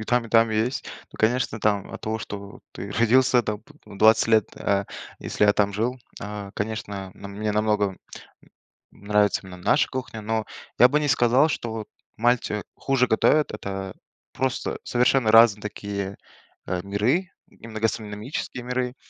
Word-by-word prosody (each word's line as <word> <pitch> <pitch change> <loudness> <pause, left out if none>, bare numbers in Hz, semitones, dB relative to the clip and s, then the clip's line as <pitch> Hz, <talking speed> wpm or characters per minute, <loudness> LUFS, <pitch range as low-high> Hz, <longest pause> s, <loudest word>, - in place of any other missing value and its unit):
и - - -5
там, 120 +1 +1
и - - -13
там 115 0 +5
есть. 110 +4 -1 0.3
Ну, - - -12
конечно, 115 0 +1
там 100 -2 0
от - - -7
того, 110 +1 -2
что 100 -1 -8
ты - - -7
родился 125 +2 +4
там 105 -1 -3
п 150 +7 -20
в 100 -2 -12
20 110 +1 +5
лет, 110 -2 +4
э, 100 0 0 0.3
если - - 0
я 105 - +6
там 100 -1 +1
жил, 115 +5 -1 0.2
а, 105 -1 -6
конечно, 100 -3 -4
на 100 - -10
мне 105 +2 -3
намного 105 0 +2
н 95 - -13 0.9
нравится 105 0 +1
именно 95 -1 -10
наша 90 +11 +2
кухня, 130 -4 -5
но 110 +1 -1 0.3
я 125 - +8
бы 150 +3 +2
не 150 - 0
сказал, 130 +2 +4
что 120 -6 -3
вот 110 -2 -6 0.3
Мальте 115 -3 +1
хуже 135 -2 +1
готовят. 150 +7 +3
Это 95 -2 -5 0.4
просто 130 -1 -2
совершенно 125 -2 +2
разные 115 -2 +7
такие, 100 -2 -5 0.5
э, 90 0 -2
миры, 120 - 0 0.2
именно 110 -1 -9
гастрономические 110 +3 -3
миры. 125 0 -2
110 Hz, 165 wpm, -24 LUFS, 105-125 Hz, 0.9 s, я